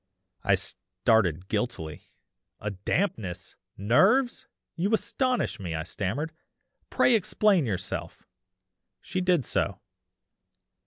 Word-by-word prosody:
"I - - +4
started 95 -6 0
guiltily. 100 -8 -3 0.5
'A 105 - -3
dampness! 95 - -2 0.2
Nerves! 195 - +3 0.3
you 185 +5 0
astonish 250 - -1
me,' 85 -4 -4
I 80 - -2
stammered, 105 - -3 0.6
'pray 250 - +4
explain 200 - +3
yourself.' 95 -3 -4 0.7
She 185 - -3
did 180 -7 +2
so. - - 0
115 Hz, 95 wpm, -27 LUFS, -, 0.7 s, I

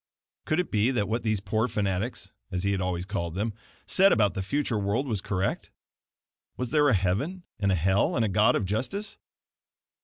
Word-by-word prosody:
Could 155 - +1
it 180 - -1
be 105 +3 +3
that 120 -6 0
what 115 +2 -1
these 110 -3 0
poor 110 +4 0
fanatics, 100 0 -2 0.2
as 90 -2 -3
he 100 - +1
had 95 -1 0
always 90 -1 -2
called 85 -4 -3
them, 105 +3 -1 0.3
said 195 +1 +5
about 105 -4 +3
the 95 - -3
future 115 +2 -1
world 100 +7 0
was 110 -6 -1
correct? 95 0 -2 0.9
Was 125 -2 -3
there 150 -1 +4
a 125 - +4
heaven, 105 - -1 0.2
and 100 -2 +2
a - - +3
hell, 95 +4 +2
and 115 - +2
a - - +1
God 105 +2 +3
of 105 - 0
justice? 130 - -3
105 Hz, 195 wpm, -27 LUFS, 95-125 Hz, 0.9 s, said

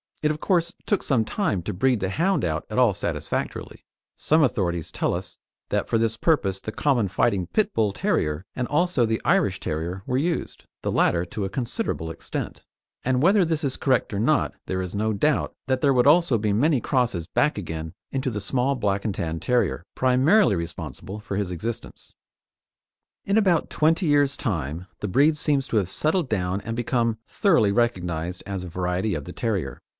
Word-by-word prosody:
It, 150 - +3
of 155 0 -2
course, 170 -2 +1
took 205 - +1
some 120 -6 +1
time 105 - -1
to - - -3
breed 125 +5 +2
the 95 -1 -1
hound 175 - +1
out 80 -1 -2
at 110 - -4
all 125 -5 +5
satisfactorily; - - -4 0.3
some 155 +1 +3
authorities 85 - 0
tell - - 0
us - - -6 0.3
that - - 0
for - - +1
this 115 0 +1
purpose 100 - +1
the 110 - -5
common 120 -3 +1
fighting 95 -1 +1
pit 215 - 0
Bull 110 -3 +2
terrier 75 -3 -1
and 125 -1 -2
also 160 -4 +2
the 110 0 -1
Irish - - +2
Terrier 85 +5 -4
were 125 - 0
used, 165 +3 -2 0.2
the - - -1
latter 85 - +2
to 100 +3 -4
a - - -3
considerable 120 - -3
extent; 80 - -6 0.4
and 130 0 +1
whether 190 +5 +5
this 160 -1 -1
is 135 -2 -1
correct 130 -5 +1
or 100 - -1
not 145 +8 +2
there 95 0 -1
is 90 -2 -5
no 110 +2 0
doubt 150 +8 +1
that 130 0 0
there 140 -1 +4
would 125 +1 +3
also 155 -5 +5
be 105 -1 0
many 135 +4 +2
crosses 120 - 0
back 150 -4 +1
again 80 -4 -5 0.2
into 135 0 -1
the 105 -2 -4
small 130 +5 0
Black 100 -5 -1
and 105 - 0
Tan 80 -1 -3
Terrier, 120 -7 0
primarily 130 - +4
responsible 85 +4 -6
for 105 -2 -5
his 100 -2 -1
existence. 110 +7 -6 1.1
In 200 +2 +2
about 185 -6 +2
twenty 165 +4 +2
years' 145 -2 +3
time, 80 - -3
the 105 - -3
breed 145 +10 +4
seems 145 -3 0
to 115 - +1
have 95 -4 +1
settled 155 - +1
down 95 -2 0
and 115 +1 -4
become 115 -1 0
thoroughly 140 - +3
recognised 90 -7 -1
as 95 -2 -4
a - - -6
variety 90 +3 -1
of 75 -3 -5
the 90 - -8
terrier. 100 - -2
115 Hz, 190 wpm, -24 LUFS, 95-145 Hz, 1.1 s, all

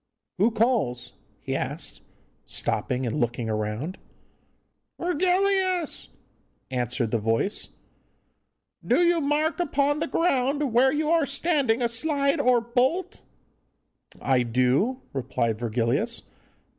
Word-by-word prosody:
'Who 210 +5 +5
calls?' 215 - 0 0.3
he - - -3
asked, - - -3 0.4
stopping 125 0 -2
and 120 +5 -2
looking 120 -2 -1
round. 110 - -3 1.0
'Virgilius!' 370 0 +1 0.6
answered 125 -2 -1
the 115 - +1
voice, 115 - -1 1.1
'do 350 - +3
you 340 -1 +3
mark 300 +4 0
upon 290 -3 +1
the 330 - -1
ground 280 -5 +1
where 260 +3 +5
you 305 +2 0
are 330 -4 +3
standing 275 -6 +1
a - - +3
slide 280 +5 +1
or 250 -3 +4
bolt?' 250 +10 0 1.0
'I 130 -2 +2
do,' 130 - +1
replied 120 -4 -1
Virgilius. 115 0 0
245 Hz, 105 wpm, -25 LUFS, -, 1.1 s, Who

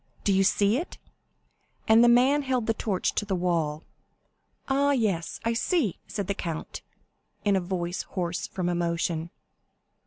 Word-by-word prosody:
Do 200 - +2
you 195 0 +4
see 205 +3 +3
it?" 340 +6 -5 0.9
and 225 +2 +7
the 240 - +6
man 260 +5 +5
held 260 -4 -1
the 225 - +1
torch 205 -4 -1
to - - -1
the 200 -2 -2
wall. 165 -4 -1 0.8
50223m 270 - +1
"Ah, 285 0 +3
yes; 200 -10 -1
I 230 - +2
see," 230 - 0
said 200 -2 -3
the 200 - -1
count, 165 -4 -5 0.6
in 200 -1 +3
a 190 - +1
voice 175 -1 -3
hoarse 180 -1 -3
from 180 -2 -3
emotion. 170 -1 -1
195 Hz, 160 wpm, -27 LUFS, 175-230 Hz, 0.9 s, and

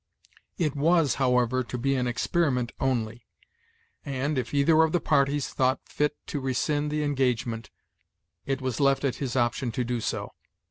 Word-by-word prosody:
It 155 -6 0
was, 160 0 +3
however, 125 0 +2
to 125 - -5
be 135 +3 +1
an 125 -2 0
experiment 125 0 0
only; 120 -3 -1 0.8
and, 140 +1 -2
if 125 - -4
either 150 +3 +4
of 160 -1 +2
the 175 - +3
parties 145 -2 +1
thought 130 0 +1
fit 150 0 -1
to 145 - -3
rescind 145 +3 0
the 150 0 -1
engagement, 125 -5 -1 0.7
it 135 0 -2
was 130 -3 -2
left 140 -1 +3
at 130 -4 -1
his 130 -3 -3
option 120 +1 +1
so - - -3
to 125 - -1
do. 120 -1 -2
135 Hz, 165 wpm, -27 LUFS, 125-145 Hz, 0.8 s, either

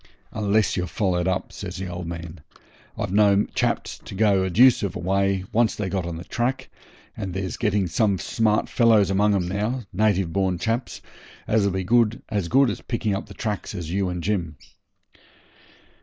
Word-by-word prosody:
'Unless 105 0 +1
you're 90 -1 -1
followed 90 -2 0
up,' 95 0 -2
says 90 -3 -6
the 95 - -4
old 90 -1 -6
man. 85 -1 -7 0.6
'I've 100 - -3
known 100 -1 +4
chaps - - -1
to - - -10
go 100 -2 +3
a 95 - -1
deuce 120 +8 +5
of 100 -4 -3
a - - -4
way, 95 +1 0
once 115 -1 +2
they 100 -3 -3
got 90 -1 -2
on 85 -1 -5
the 85 - -7
track, 130 +7 -2 0.4
and 95 -2 -5
there's 95 -1 -3
getting 105 -4 +1
some 100 +3 +1
smart 110 +2 +1
fellows 110 -5 +4
among 100 +1 +3
'em 90 -3 0
now 105 +7 -2
native 95 -4 +1
born 95 -1 +1
chaps 115 +6 -3 0.4
as'll 105 -2 +2
be 95 -1 -3 0.4
as 100 -6 -1
good 135 +5 +4
at - - -8
picking 115 -4 -1
up 95 - -5
the - - -12
tracks 105 -2 -4
as 85 -3 -5
you 95 0 0
and 90 -1 -4
Jim.' 90 -6 -1
100 Hz, 185 wpm, -24 LUFS, 90-105 Hz, 0.6 s, deuce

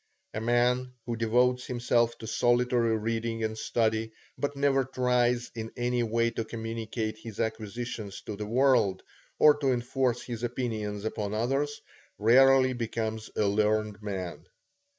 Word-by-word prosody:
A 110 - -3
man 125 +2 +1
who 120 - -2
devotes 125 +3 +2
himself 120 -1 +1
to 115 - -9
solitary 120 0 +2
reading 115 +1 -2
and 110 0 -1
study, 110 0 0 0.2
but 145 0 -2
never 140 -1 +2
tries 125 -2 +1
in 115 -1 -6
any 120 0 0
way 115 0 +1
to 115 - -3
communicate 110 -1 -4
his 110 -2 -9
acquisitions 110 -1 -4
to 105 - -5
the 105 +1 -5
world, 120 -5 +3 0.3
or 150 - +7
to 140 -2 +1
enforce 125 0 0
his 120 -2 -6
opinions 110 -4 -3
upon 105 -1 -3
others, 135 +6 -1 0.4
rarely 130 +4 +5
becomes 110 -2 -3
a 105 - +2
learned 105 +1 +1
man. 95 -4 -5
115 Hz, 140 wpm, -28 LUFS, 110-125 Hz, 0.4 s, or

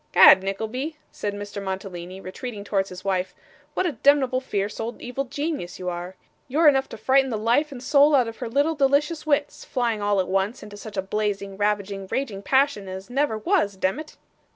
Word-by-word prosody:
''Gad, 190 - +9
Nickleby,' 220 +10 -3 0.2
said 205 -1 -4
Mr. 205 0 -6
Mantalini, 190 -1 -5
retreating 200 +3 -7
towards 195 -1 0
his 180 +1 -10
wife, 190 -1 -1 0.4
'what - - +1
a 340 - 0
demneble 270 -3 +4
fierce 205 -5 -3
old 230 +1 -4
evil 250 +3 -4
genius 285 - -4
you 180 -1 -3
are! 175 +1 -5 0.3
You're 305 +5 +3
enough 270 -2 +4
to - - -8
frighten 265 +4 +3
the 225 - -1
life 240 +8 +2
and 255 -2 -8
soul 290 +2 +5
out 250 -4 +4
of 225 - -7
her 245 - -5
little 285 +6 +2
delicious 295 +3 +1
wits 290 -1 0
flying 235 -4 -1
all 205 -1 +2
at 185 - 0
once 195 +5 -1
into 210 -1 -10
such 205 0 -9
a 190 - 0
blazing, 200 -1 -2
ravaging, 200 -1 -1
raging 225 -8 -2
passion 265 -4 +2
as 190 +4 -7
never 270 -4 +1
was, 215 - +1
demmit! 240 +13 -2
220 Hz, 195 wpm, -24 LUFS, 195-275 Hz, 0.4 s, Gad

